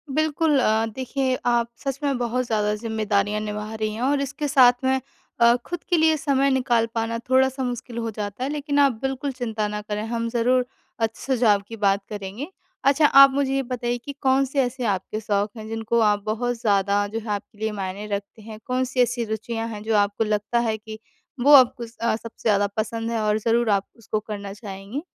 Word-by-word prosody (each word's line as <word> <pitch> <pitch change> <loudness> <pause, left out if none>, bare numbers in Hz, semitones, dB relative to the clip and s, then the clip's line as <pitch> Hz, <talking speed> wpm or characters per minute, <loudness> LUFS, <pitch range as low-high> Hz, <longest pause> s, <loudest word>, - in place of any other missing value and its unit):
बिल्कुल 310 -1 +2
अ, 220 -1 +2
देखिए, 260 0 -1
आप 235 -1 +2
सच 275 0 -3
में 275 -3 +1
बहुत 245 +1 -1
ज़्यादा 210 -2 0
ज़िम्मेदारियाँ 210 -2 -1
निभा 210 +1 -5
रही 215 -1 -2
हैं 225 - -6
और 280 +2 +1
इसके 280 +2 -3
साथ 255 -3 +6
में 265 0 +2 0.4
अ, 235 0 +6
खुद 350 -1 -5
के 350 - +3
लिए 320 0 +4
समय 275 -2 +2
निकाल 245 -3 +2
पाना 225 0 -1
थोड़ा-सा 265 0 +3
मुश्किल 245 -1 -5
हो 230 -1 -2
जाता 205 +3 -5
है। 270 - -1
लेकिन 290 -1 -1
आप 280 -1 +5
बिल्कुल 270 +1 -2
चिंता 225 -4 -3
ना 210 0 -4
करें, 210 0 -4
हम 230 0 -2
ज़रूर 245 +2 +2 0.3
अच्छे 225 0 -2
सुझाव 230 -6 +3
की 225 - -7
बात 200 -1 +2
करेंगे। 205 +6 -6 0.4
अच्छा, 280 +3 +4
आप 275 -1 +8
मुझे 275 -1 0
ये 270 - +1
बताइए 245 -1 -2
कि 280 +4 -8
कौन-से 270 +1 +2
ऐसे 250 0 -3
आपके 190 +3 -6
शौक 205 -1 -1
हैं, 215 - -8
जिनको 225 +1 -1
आप 210 -2 +2
बहुत 245 +3 -1
ज़्यादा, 205 -2 +2
जो 225 +2 -4
है, 225 - -11
आपके 205 +1 -5
लिए 220 0 -2
मायने 200 +1 -5
रखते 200 +2 -8
हैं? 215 0 -10
कौन-सी 255 0 -1
ऐसी 245 0 +1
रुचियाँ 225 +1 -3
हैं, 215 -2 -7
जो 220 0 0
आपको 205 +1 +1
लगता 210 +2 0
है 220 - -1
कि 215 0 -10 0.4
वो 290 - +7
आपको 250 -3 +6
अ, 230 -1 -2
सबसे 230 0 -10
ज़्यादा 205 -1 +3
पसंद 225 +1 -2
है 225 -2 -1
और 210 0 +2
ज़रूर 230 +1 +1
आप 200 -1 +1
उसको 215 -1 -3
करना 205 -2 -7
चाहेंगी? 200 +5 -7
230 Hz, 205 wpm, -23 LUFS, 210-260 Hz, 0.4 s, आप